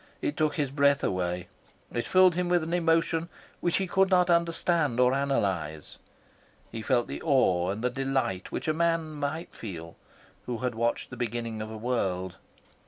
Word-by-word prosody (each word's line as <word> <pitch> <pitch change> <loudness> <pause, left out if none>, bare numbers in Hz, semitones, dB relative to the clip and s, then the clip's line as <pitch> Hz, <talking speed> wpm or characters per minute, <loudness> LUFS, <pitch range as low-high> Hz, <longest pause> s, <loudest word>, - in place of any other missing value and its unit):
It 310 -4 -2
took 155 -1 +1
his 145 -5 -1
breath 140 0 +3
away. 90 -1 -1 0.5
It 120 - -2
filled 185 -1 +6
him 180 +1 -1
with 175 -2 +3
an 165 +2 -4
emotion 165 -1 +1 0.3
which 175 - +1
he 195 - 0
could 190 +1 +2
not 180 -2 +4
understand 170 -5 +1
or 125 0 +5
analyse. 95 - -1 0.7
He 115 - -5
felt 120 +2 +1
the - - -6
awe 95 - +3
and 105 +4 -3
the 125 - +1
delight 135 -8 -1
which - - -4
a 155 - +2
man 165 -1 +1
might 150 +3 -4
feel 85 -6 -8 0.5
who 125 - -2
watched 120 0 -1
the 125 - -7
beginning 115 -2 -3
of 110 - -5
a 110 - -7
world. 95 -6 -2
135 Hz, 170 wpm, -28 LUFS, 110-165 Hz, 0.7 s, filled